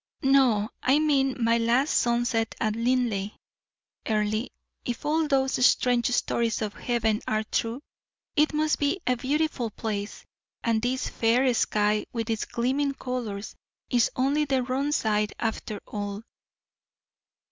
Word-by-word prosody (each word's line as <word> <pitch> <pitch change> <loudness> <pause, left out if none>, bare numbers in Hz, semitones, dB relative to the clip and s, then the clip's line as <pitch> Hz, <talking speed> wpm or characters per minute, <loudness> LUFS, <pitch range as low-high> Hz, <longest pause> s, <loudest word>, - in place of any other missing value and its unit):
"No; 255 -6 +3
I 265 +3 +4
mean 275 -3 +2
my 230 0 +3
last 240 +5 +2
sunset 235 -2 +1
at 215 -1 0
Linleigh. 230 -4 0 0.7
Earle, 215 +1 0 0.4
if 245 0 -4
all 310 +1 +1
those 265 -2 +1
strange 245 -1 +3
stories 235 -2 0
of 210 -1 -3
heaven 225 -3 0
are 215 0 0
true, 230 +5 -2 0.5
it 300 +1 +3
must 305 0 +1
be 290 +6 +1
a 250 - +2
beautiful 275 -1 -1
place; 210 -1 -5 0.4
and 225 -2 +1
this 255 +2 -1
fair 245 +3 +2
sky, 210 -2 +1
with 230 -1 -2
its 220 - -1
gleaming 270 +4 -1
colors, 230 -6 -5 0.4
is 240 -3 +3
only 275 +4 +2
the 265 -2 +1
wrong 265 +3 -1
side 210 -7 +1
after 220 -2 -3
all." 205 0 -5
240 Hz, 135 wpm, -26 LUFS, 220-270 Hz, 0.7 s, I